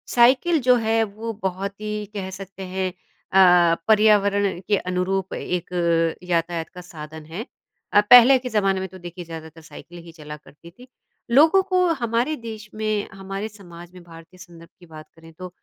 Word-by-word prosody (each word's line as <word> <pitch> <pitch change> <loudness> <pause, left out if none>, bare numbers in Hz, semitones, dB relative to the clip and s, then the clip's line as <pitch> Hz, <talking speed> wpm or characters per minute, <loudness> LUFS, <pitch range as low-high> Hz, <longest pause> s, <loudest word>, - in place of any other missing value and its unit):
Cycle 265 +7 +4
जो 250 - +7
है 225 0 +2
वो 220 +2 -6
बहुत 195 +1 -3
ही 210 0 -4
कह 190 -2 -4
सकते 195 0 -9
हैं 185 -1 -2 0.4
अ, 180 -3 +5
पर्यावरण 205 -3 +3
के 205 - +2
अनुरूप 185 +1 -2
एक 180 -1 -4 0.5
यातायात 170 -2 -2
का 180 - -11
साधन 160 -3 -11
है। 175 +10 -7 0.5
अ, 205 - +6
पहले 245 +2 +9
के 250 0 -6
ज़माने 195 -3 +1
में 190 - -4
तो 185 - -12
देखिए 175 0 -9
ज़्यादातर 160 -1 -10
साइकिल 175 +2 -13
ही 165 - -12
चला 150 -1 -9
करती 155 +3 -17
थी। 250 +8 -17 0.4
लोगों 320 +9 +5
को 365 0 +3 0.2
हमारे 235 +6 0
देश 215 -1 -8
में 215 -1 -2
हमारे 195 +2 -6
समाज 175 -4 -14
में 180 - -13
भारतीय 165 +1 -15
संदर्भ 170 -2 -14
की 175 - -16
बात 155 -1 -13
करें 165 0 -16
तो 185 +2 -9
190 Hz, 175 wpm, -22 LUFS, 170-215 Hz, 0.5 s, पहले